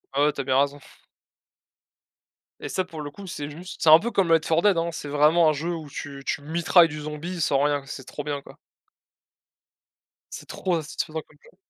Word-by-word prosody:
ouais, 140 - +2
ouais 150 - +2
tu 140 - -3
as - - -5
bien 130 0 +2
raison. 145 +1 0 1.8
Et - - -5
ça 185 - -1
pour 160 -4 -8
le 145 -1 -6
coup 195 +4 -11
c'est 150 -5 -5
juste 175 +5 -10
c'est 160 - +4
un 155 +1 +10
peu 235 +4 -3
comme 195 -5 +1
Left 165 -1 +3
4 165 +1 +3
Dead, 205 -4 +4
hein. 165 +1 0
C'est 145 - -6
vraiment 155 +3 +4
un - - +2
jeu 165 +4 -3
où 155 -3 -8
tu 140 0 -7
tu - - -2
mitrailles 170 +2 +4
du 150 -1 -7
zombie 155 +4 -5
sans 140 -2 +2
rien, 145 -1 +1
c'est 135 -1 -8
trop 145 - -7
bien 145 -1 -3
quoi. - - -15 1.8
C'est - - -8
trop 175 -4 -1
satisfaisant 160 0 -4
comme 150 - -24
jeu. - - -20
155 Hz, 215 wpm, -25 LUFS, 145-170 Hz, 1.8 s, un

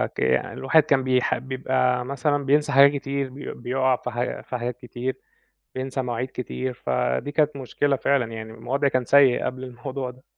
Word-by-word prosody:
ك - - -5
الواحد 155 +4 +2
كان 140 -3 +2
بيح 130 -1 +2
بيبقى 130 -1 0
مثلًا 140 +2 -1
بينسى 150 +1 +2
حاجات 140 0 +7
كتير، 140 -1 -2
بي 135 +3 -7
بيقع 130 +1 +1
في 125 - -5
ح 120 +1 -3
في 125 - -2
حاجات 120 0 -4
كتير، 125 +1 -5 0.6
بينسى 130 +1 -2
مواعيد 125 +1 -3
كتير، 125 +1 -4
فدي 65 - -1
كانت 150 -1 +2
مشكلة 135 +2 0
فعلًا 130 -3 +1
يعني 110 0 -7
الم 115 - -14
الوضع 140 +2 +1
كان 130 -2 0
سيء 140 -3 +5
قبل 130 0 -4
الموضوع 130 +1 -5
ده. 130 +1 -21
130 Hz, 180 wpm, -24 LUFS, 125-140 Hz, 0.6 s, حاجات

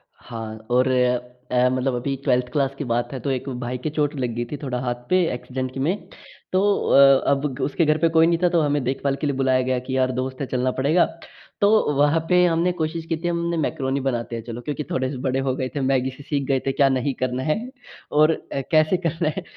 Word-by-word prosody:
हाँ, 110 -2 -8
और 125 +2 +3 0.6
अ, 125 0 +3
मतलब 130 0 0
अभी 135 +3 -2
12th 125 -2 +2
क्लास 140 -1 0
की - - -3
बात 120 +1 0
है 130 - -4
तो 135 +3 -2
एक 130 +1 -3
भाई 125 +1 -3
के 125 +5 -3
चोट 150 -1 -1
लग 125 -2 -1
गई 120 0 -2
थी 150 - -3
थोड़ा 125 -3 -2
हाथ 120 -1 -4
पे 185 0 +4
एक्सीडेंट 130 +1 -4
की 135 - -6
में। 170 +9 -1 0.4
तो 185 +1 +2 0.3
अ, 135 -1 +7
अब 140 -1 -1
उसके 160 +3 +1
घर 155 0 +3
पे 165 +1 +2
कोई 160 0 +4
नहीं 170 0 +2
था 180 - +5
तो 170 -2 +2
हमें 145 -2 +1
देखभाल 135 +2 -1
के 150 - 0
लिए 140 - -1
बुलाया 130 -1 +2
गया 130 0 0
कि 130 +1 -4
यार 130 0 +2
दोस्त 130 +1 -5
है - - 0
चलना 130 0 0
पड़ेगा। 155 +6 +4 0.6
तो 200 - +5 0.3
वहाँ 145 +3 +3
पे 180 0 +5
हमने 170 +1 +2
कोशिश 160 +1 -2
की 165 - 0
थी 170 +2 -4
हमने 170 0 -1
मैकरोनी 135 -3 -1
बनाते 120 -2 -2
हैं 115 - -5
चलो 120 +1 -7
क्योंकि 150 +4 -4
थोड़े 130 0 0
से 135 - -5
बड़े 130 0 -1
हो 135 -1 -1
गए 130 -1 -2
थे, 145 - -1
मैगी 130 -1 +1
से 140 +2 -13
सीख 145 -1 -2
गए 135 -1 +2
थे - - +3
क्या 135 0 +3
नहीं 135 +1 0
करना 130 0 -1
है 155 +1 +1 0.6
और 155 +2 +5 0.4
कैसे 155 +3 +4
करना 165 -2 -1
है। - - -3
135 Hz, 240 wpm, -23 LUFS, 130-155 Hz, 0.6 s, अ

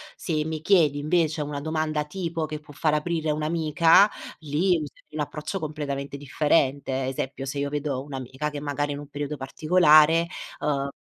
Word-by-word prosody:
Se 155 -3 -2
mi 160 -1 -4
chiedi 155 -5 +3
invece 160 +1 +1
una 145 -1 -3
domanda 155 0 -1
tipo 165 -1 -3
che 155 0 -5
può 150 -1 -15
far 155 +1 +1
aprire 155 0 0
un'amica, 160 +4 +4 0.3
lì 155 +5 -1
userei 150 -2 -9
un 155 - -5
approccio 150 +6 -3
completamente 145 -3 -4
differente. 140 -2 +1
Esempio, 135 +1 -4
se 140 +1 -4
io 140 0 -1
vedo 145 -2 -2
un'amica 135 +1 -5
che 150 -1 -6
magari 145 0 -2
è - - -1
in 140 - -6
un 145 - -9
periodo 145 +1 -4
particolare 155 +3 +4 0.3
uhm 140 -2 -1
150 Hz, 170 wpm, -25 LUFS, 145-160 Hz, 0.3 s, un'amica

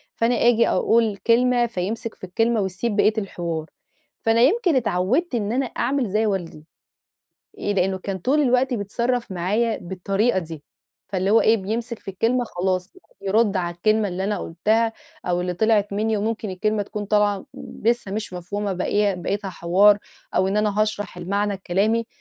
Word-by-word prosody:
فأنا 235 +1 +2
آجي 235 0 +4
أقول 225 -3 +2
كلمة 240 +2 +3
فيمسك 225 +1 -4
في - - -33
الكلمة 225 +4 +1
ويسيب 195 +4 -2
بقية 215 +1 +4
الحوار، 170 -6 -3 0.6
فأنا 225 +1 +3
يمكن 350 - +3
أتعودت 245 - +1
إن 210 -2 -1
أنا 265 +3 +1
أعمل 255 -1 -1
زي 215 +3 +1
والدي. 175 -7 -3 1.0
آآ، 205 - 0
لأنه 190 -1 +1
كان 190 0 -4
طول 270 - +2
الوقت 255 0 +2
بيتصرف 235 +2 -2
معايا 210 +6 0
بالطريقة 195 +4 0
دي، 160 -4 -7 0.5
فاللي 190 0 -1
هو 225 - +6
إيه 225 +1 +4
بيمسك 225 +4 -4
في - - -15
الكلمة 235 +6 +1
خلاص 185 -2 -2 0.3
بيرد 205 0 +2
على 175 -1 -2
الكلمة 215 +3 +2
اللي 185 +1 -3
أنا 210 +1 -1
قلتها 220 +7 0 0.3
أو 175 0 +1
اللي 180 0 -2
طلعت 210 0 +2
مني 215 +1 0
وممكن 215 0 -2
الكلمة 210 +3 0
تكون 205 +1 -5
طالعة 205 -1 +1 0.4
لسه 235 -3 +1
مش 215 -2 -4
مفهومة 195 +3 -3
باقيها 200 +2 +1
بقيتها 195 +3 -3
حوار 195 +4 +4 0.4
أو 190 - +3
إن 200 - -1
أنا 210 0 +1
هاشرح 205 -4 -3
المعنى 200 +3 -1
الكلامي، 205 +5 0
210 Hz, 160 wpm, -23 LUFS, 190-230 Hz, 1.0 s, هو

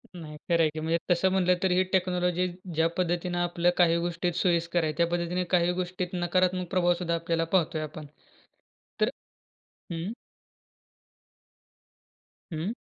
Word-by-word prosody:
नाही 155 -3 -8
खरं 170 -1 +4
आहे, 155 - +4
की 155 - -6
म्हणजे 160 +2 +1
तसं 175 +2 +3
म्हनलं 180 -1 +3
तर 190 - +2
ही 185 +1 +4
टेक्नॉलॉजी 180 -1 +1 0.3
ज्या 160 +1 +3
पद्धतीनं 175 0 -1
आपल्याला 175 0 +2
काही 170 -2 +4
गोष्टीत 175 0 -1
सोयीस्कर 170 -1 +1
आहे, 155 - 0
त्या 170 0 +3
पद्धतीने 175 +1 -1
काही 175 0 +3
गोष्टीत 180 0 -3
नकारात्मक 180 +1 +1
प्रभावसुद्धा 175 -2 +1
आपल्याला 165 0 -1
पाहतोय 165 -3 +1
आपण. 155 0 -7 1.0
तरं - - +3 0.8
हं. 170 +5 -3 2.4
हं. 165 +7 -2
175 Hz, 135 wpm, -28 LUFS, 165-180 Hz, 2.4 s, खरं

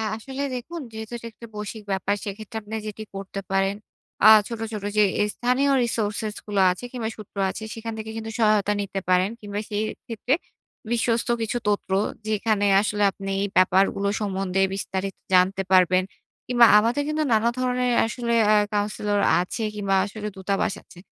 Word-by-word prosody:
আসলে 265 +5 -6
দেখুন, 320 +7 -6
যেহেতু 220 +1 -7
এটা 235 - -8
একটা 230 - -12
বৈশ্বিক 210 +1 -6
ব্যাপার 195 +1 0
সেক্ষেত্রে 215 +2 -6
আপনি 210 +1 -11
যেটি 215 +1 -6
করতে 195 0 -5
পারেন, 195 +1 +1 0.5
আ - - +11 0.2
ছোট, 230 -2 -6
ছোট 210 -2 -5
যে 210 - +6 0.3
স্থানীয় 255 +3 +1
resources 215 -2 -2
গুলো 205 -2 +1
আছে 185 - -7
কিংবা 230 -3 -3
সূত্র 210 -1 -12
আছে, 220 - -6
সেখান 225 0 -6
থেকে 220 0 -6
কিন্তু 225 0 -5
সহায়তা 210 -2 +3
নিতে 195 -1 -3
পারেন। 185 +1 +4
কিংবা 205 -1 -4
সেই 210 +1 -1 0.2
ক্ষেত্রে 240 +2 -1 0.6
বিশ্বস্ত 235 +1 +1
কিছু 225 +2 -1
তথ্য, 205 - -1 0.4
যেখানে 215 -1 +1 0.2
আসলে 210 0 0
আপনি 195 0 -7
এই 200 - 0
ব্যাপারগুলো 195 +2 +3
সম্বন্ধে 195 -2 -1 0.2
বিস্তারিত 195 0 -3 0.2
জানতে 185 +2 +4
পারবেন, 185 0 +5 0.4
কিংবা 240 -1 +6
আমাদের 235 +6 +1
কিন্তু 305 0 0
নানা 225 +2 +3
ধরনের 250 0 +1
আসলে 235 0 -2
অ্যা 215 0 +5 0.2
কাউন্সিলর 205 0 0 0.2
আছে 185 +5 -4
কিংবা 200 -2 0
আসলে 210 +1 -6
দূতাবাস 195 +1 -1
আছে। 175 - -16
210 Hz, 160 wpm, -24 LUFS, 195-230 Hz, 0.6 s, আ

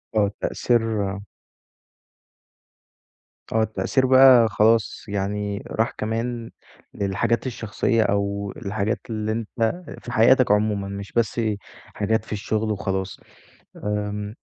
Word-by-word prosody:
آه 100 -2 +3
تأثير 110 -5 0 2.3
آه، 110 0 +2
التأثير 120 +4 0
بقى 130 -2 +7
خلاص 110 +1 +2
يعني 100 0 -2
راح 115 +1 0
كمان 115 +2 -3 0.4
للحاجات 110 +5 0
الشخصّية، 115 -1 0
أو 100 -1 -1
الحاجات 100 +2 -2
اللي 110 -1 -2
أنت 115 +8 -2 0.2
في 120 - -7
حياتك 125 0 +5
عمومًا، 105 -1 +1
مش 100 0 -7
بس 115 0 0 0.4
حاجات 110 +1 -1
في - - -14
الشغل 110 +1 -1
وخلاص. 95 -2 -3 0.7
آمم، 105 0 -3
110 Hz, 105 wpm, -23 LUFS, 100-115 Hz, 2.3 s, بقى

